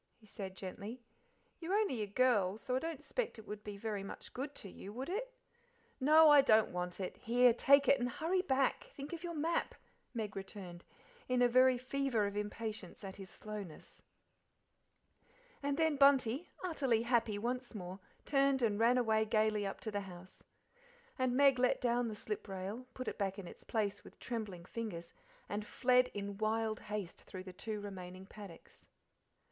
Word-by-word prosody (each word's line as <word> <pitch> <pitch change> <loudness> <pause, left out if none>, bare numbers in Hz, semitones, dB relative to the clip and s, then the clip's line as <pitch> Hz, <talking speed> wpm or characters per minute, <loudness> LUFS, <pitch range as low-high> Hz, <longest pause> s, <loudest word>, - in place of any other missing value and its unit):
he 225 - -21
said 190 -2 -7
gently. 200 +6 -6 0.6
"You're 355 +4 -1
only 400 - +1
a 210 - -2
girl, 205 -3 +2
so 250 +3 -2
I - - +2
don't 325 0 -5
'spect 475 - -2
it 220 - -11
would 210 0 -6
be 205 -1 -6
very 210 -1 -3
much 195 - -8
good 280 +3 -5
to - - -7
you, 195 +1 -9
would 255 +7 -5
it?" - - -3 0.7
"No, 310 +4 +7
I 290 -1 +9
don't 220 -5 +4
want 180 +1 -3
it. 185 - -4
Here, 245 +1 +4
take 280 +4 +5
it, 280 - +5
and 245 0 0
hurry 335 +9 0
back: 270 -7 +1
think 280 +4 -7
of 335 0 -6
your 340 -1 -4
map," 325 +3 0 0.4
Meg 215 -3 -3
returned, 190 -3 -8 0.4
in 250 0 +3
a - - +7
very 255 +1 +5
fever 255 -3 0
of 200 0 -3
impatience 210 -2 -5
at 190 -1 -7
his 195 -1 -9
slowness. 205 -7 -9 1.6
And 285 0 -1
then 320 -3 +2
Bunty, 275 +1 +4
utterly 270 -10 +1
happy 235 -3 +2
once 245 +2 -3
more, 185 -1 -6 0.3
turned 275 -2 +3
and 210 -2 +2
ran 235 +2 +5
away 220 -3 +3
gaily 215 -1 +2
up 195 - -5
to 220 - -4
the 205 -1 -1
house. 185 -1 -11 0.8
And 255 -1 +2
Meg 275 -2 +6
let 250 0 +3
down 240 0 +1
the 220 - -4
slip 210 0 -5
rail, 195 +6 -5
put 255 - -5
it - - -4
back 195 -1 -1
in 195 -3 -7
its - - -12
place 205 -3 -1
with - - -14
trembling 210 -8 -5
fingers, 180 -7 -6 0.3
and 210 +1 -3
fled 250 +3 +3
in 200 0 -4
wild 220 0 0
haste 210 -4 -5
through 185 -1 -8
the 185 -1 -9
two 210 +3 -4
remaining 190 -2 -8
paddocks. 195 -4 -13
225 Hz, 180 wpm, -35 LUFS, 200-260 Hz, 1.6 s, I